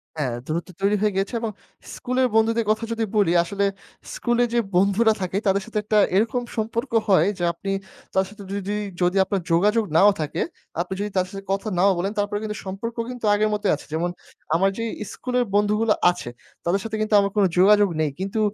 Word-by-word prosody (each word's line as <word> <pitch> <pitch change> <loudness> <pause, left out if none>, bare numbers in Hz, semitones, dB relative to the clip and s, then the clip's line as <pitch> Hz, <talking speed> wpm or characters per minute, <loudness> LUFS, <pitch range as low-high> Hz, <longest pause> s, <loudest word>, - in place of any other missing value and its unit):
হ্যাঁ, 130 -6 -2
দূরত্ব 170 +3 -3
তৈরি 200 +1 +3
হয়ে 210 -2 +1
গেছে 195 +5 -1
এবং 225 -2 -2 0.4
স্কুলের 255 0 0
বন্ধুদের 225 0 +3
কথা 220 +2 +1
যদি 230 0 -1
বলি, 195 -5 +3
আসলে 200 +3 -1 0.5
স্কুলে 240 0 +1
যে 240 - +3 0.2
বন্ধুরা 200 +4 +4
থাকে, 185 +1 -2
তাদের 195 +1 +3
সাথে 220 -1 -5
একটা 215 0 +1 0.2
এরকম 230 +4 +2 0.2
সম্পর্ক 230 +4 -2 0.2
হয় 185 -3 +4
যে, 175 - -4
আপনি 195 +4 -5 0.4
তাদের 190 0 +2
সাথে 210 -1 -11
যদি, 200 +1 -3 0.3
যদি 180 +2 +2
আপনার 195 -1 -2
যোগাযোগ 210 +6 +3
নাও 205 +4 +7
থাকে, 150 - -3 0.4
আপনি 185 +2 -4
যদি 210 +1 -2
তাদের 185 0 +1
সাথে 195 0 -7
কথা 195 +3 -1
নাও 195 +1 +5
বলেন, 195 +3 -1
তারপরেও 205 +1 -1
কিন্তু 210 0 -4
সম্পর্ক 200 +5 -5
কিন্তু 245 -3 -5
আগের 215 +1 +2
মতই 205 -1 +1
আছে। - - -12
যেমন 170 +2 0 0.5
আমার 195 +3 +3
যেই 230 0 -2 0.2
ইস্কুলের 250 +2 -2
বন্ধুগুলো 210 +1 +3 0.2
আছে, 175 -9 -7 0.4
তাদের 190 +3 +1
সাথে 220 -1 -4
কিন্তু 215 0 -1
আমার 200 -1 +1
কোন 205 - +4
যোগাযোগ 205 +1 +6
নেই। 150 -2 0
কিন্তু 195 +3 -2
205 Hz, 195 wpm, -23 LUFS, 190-220 Hz, 0.5 s, নাও